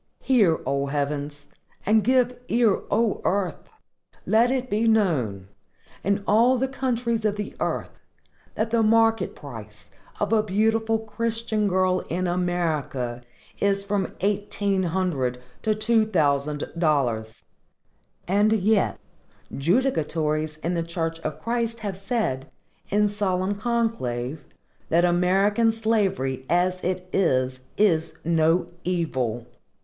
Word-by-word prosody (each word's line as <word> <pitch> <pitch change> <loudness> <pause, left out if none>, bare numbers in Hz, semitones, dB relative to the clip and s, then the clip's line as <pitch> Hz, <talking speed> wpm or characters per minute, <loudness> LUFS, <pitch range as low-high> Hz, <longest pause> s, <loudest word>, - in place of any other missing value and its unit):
Hear, 210 -11 +3
O 140 0 0
heavens! 145 +1 -3 0.4
and 215 +1 +4
give 250 +1 +2
ear, 230 -4 +2
O 225 -2 +1
earth! 185 -3 -1 0.6
Let 230 +3 +4
it 260 -1 -1
be 225 0 +1
known, 140 - +1 0.6
in 200 +1 0
all 235 +5 +4
the 265 +2 0
countries 240 -4 -1
of 210 -1 +1
the 210 -1 -5
earth, - - -2 0.6
that 220 +1 -1
the 230 -1 +3
market 225 0 +3
price 110 -7 -11 0.3
of 205 +1 0
a 220 - +5
beautiful 220 +2 +1
Christian 225 -1 -2
girl 185 -1 +2
in 180 +2 -1
America 160 -9 -1 0.4
is 200 0 +1
from 200 -2 -2
EIGHTEEN 200 -1 0
HUNDRED 160 -9 -1 0.2
to 215 -1 +1
TWO 220 +1 +2
THOUSAND 145 -5 +1 0.2
DOLLARS; 120 -9 0 0.8
and 205 +4 +3
yet, 210 0 +2 0.6
judicatories 155 - 0
in 175 - 0
the 170 - 0
church 165 -1 -3
of - - -5
Christ 230 0 -2
have 200 -3 -3
said, 195 - -2 0.4
in 210 +1 +3
solemn 200 -2 -1
conclave, 200 - -2 0.5
that 170 +2 +4
AMERICAN 195 +6 +3
SLAVERY 205 - 0
AS 180 +2 +1
IT 185 0 -2
IS 130 -8 +1 0.2
IS 170 -7 +2
NO 165 +1 +3 0.2
EVIL! 130 -10 -1
190 Hz, 120 wpm, -24 LUFS, 155-220 Hz, 0.8 s, a